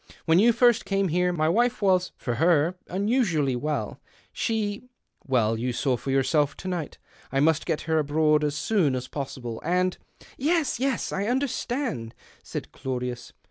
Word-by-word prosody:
When 165 Hz, +1 st, +4 dB
you 235 Hz, +4 st, +6 dB
first 240 Hz, 0 st, +4 dB
came 195 Hz, -1 st, 0 dB
here, 180 Hz, +2 st, +2 dB
my 155 Hz, -3 st, 0 dB
wife 240 Hz, +8 st, +2 dB
was 185 Hz, -3 st, +2 dB
— -, -, -49 dB
for 120 Hz, -, -3 dB
her 165 Hz, 0 st, +4 dB
— -, -, -31 dB
un 195 Hz, +3 st, -1 dB
usually 170 Hz, -, +2 dB
well. 150 Hz, +4 st, -3 dB, 0.3 s
She 220 Hz, +1 st, -2 dB, 0.2 s
— -, -, -33 dB
well 115 Hz, -4 st, +2 dB
you 125 Hz, +3 st, -2 dB
saw 125 Hz, +1 st, 0 dB
for 130 Hz, -, -6 dB
yourself 135 Hz, +2 st, +2 dB
to 190 Hz, -, -7 dB
night. 175 Hz, -5 st, -4 dB, 0.3 s
I 135 Hz, -, +1 dB
must 155 Hz, +1 st, +2 dB
get 160 Hz, -3 st, 0 dB
her 160 Hz, 0 st, +1 dB
abroad 150 Hz, +1 st, +2 dB
as 145 Hz, -1 st, 0 dB
soon 155 Hz, -5 st, +1 dB
as 130 Hz, 0 st, -4 dB
possible. 130 Hz, -5 st, -6 dB
And 180 Hz, +2 st, 0 dB
" -, -, -23 dB
" -, -, -24 dB
Yes, 325 Hz, -8 st, +1 dB
yes, 265 Hz, -1 st, -1 dB
I 200 Hz, +2 st, -1 dB
understand," 245 Hz, -, -2 dB, 0.3 s
said -, -, -6 dB
Claudius. 125 Hz, -2 st, -4 dB
160 Hz, 185 wpm, -26 LUFS, 135-205 Hz, 0.3 s, you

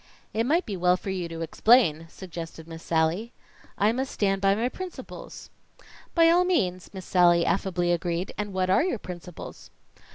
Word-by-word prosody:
"It 225 Hz, +2 st, 0 dB
might 335 Hz, +6 st, +2 dB
be 205 Hz, -, -4 dB
well 180 Hz, 0 st, +3 dB
for 195 Hz, -, -5 dB
you 180 Hz, -3 st, -3 dB
to 165 Hz, 0 st, -6 dB
explain," 165 Hz, -2 st, +3 dB
suggested 165 Hz, -3 st, -9 dB
Miss 165 Hz, 0 st, -9 dB
Sallie. 165 Hz, +9 st, 0 dB, 0.4 s
"I 205 Hz, +2 st, +3 dB
must 260 Hz, +3 st, -3 dB
stand 195 Hz, -2 st, 0 dB
by 195 Hz, 0 st, +4 dB
my 230 Hz, +3 st, 0 dB
principles." 370 Hz, +7 st, -9 dB, 0.6 s
"By 330 Hz, -1 st, +6 dB
all 350 Hz, +1 st, +4 dB
means!" 185 Hz, -, 0 dB
Miss 190 Hz, -2 st, -8 dB
Sallie 175 Hz, -2 st, +4 dB
affably 175 Hz, -2 st, 0 dB
agreed. 175 Hz, +1 st, -2 dB
"And 205 Hz, -1 st, -4 dB
what 185 Hz, -1 st, 0 dB
are -, -, +4 dB
your 350 Hz, -9 st, -1 dB
principles?" 180 Hz, -3 st, -9 dB
185 Hz, 170 wpm, -26 LUFS, 170-225 Hz, 0.6 s, By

